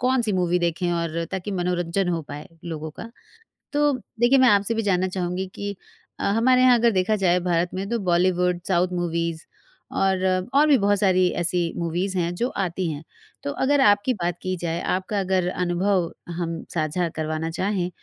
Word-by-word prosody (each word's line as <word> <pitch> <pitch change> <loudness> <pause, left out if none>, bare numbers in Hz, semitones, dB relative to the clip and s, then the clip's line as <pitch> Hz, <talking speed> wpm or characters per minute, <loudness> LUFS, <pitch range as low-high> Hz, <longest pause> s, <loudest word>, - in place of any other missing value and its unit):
कौन-सी 250 -4 +1
मूवी 180 0 +1
देखें 175 +1 -1
और 170 -1 -2
ताकि 190 +1 -4
मनोरंजन 175 +1 0
हो 170 -2 -1
पाए 145 +1 -8 0.2
लोगों 160 -2 -5
का? 225 +9 -10 0.6
तो 295 0 +3 0.3
देखिए 245 +3 +5
मैं 260 - +6
आपसे 205 +2 +3
भी 225 - 0
जानना 185 -1 +2
चाहूँगी 185 0 -3
कि 205 0 -4 0.4
अ, - - -4
हमारे 240 +5 +3
यहाँ 255 -1 +6
अगर 235 0 +4
देखा 195 +2 +1
जाए 180 -3 +2
भारत 170 +1 +1
में 190 +1 -3
तो 235 - 0
बॉलीवुड, 180 0 +2
साउथ 180 -1 +2
मूवीज़ 170 -2 -2 0.5
और 190 -1 +1 0.3
और 295 +2 +6
भी 285 - +6
बहुत 200 -1 +2
सारी 185 -2 +3
ऐसी 175 -1 0
मूवीज़ 175 +3 -2
हैं, 175 0 0
जो 240 - 0
आती 185 -1 -2
हैं। 150 +1 -7 0.4
तो 140 - -2
अगर 285 0 +3
आपकी 205 +3 +4
बात 175 -5 -2
की 185 0 -2
जाए, 170 -1 -2
आपका 190 +2 -1
अगर 185 -1 0
अनुभव 180 0 0 0.3
हम 165 -1 -3
साझा 165 +2 0
करवाना 155 +1 -2
चाहें 185 +1 -1
180 Hz, 180 wpm, -24 LUFS, 170-200 Hz, 0.6 s, मैं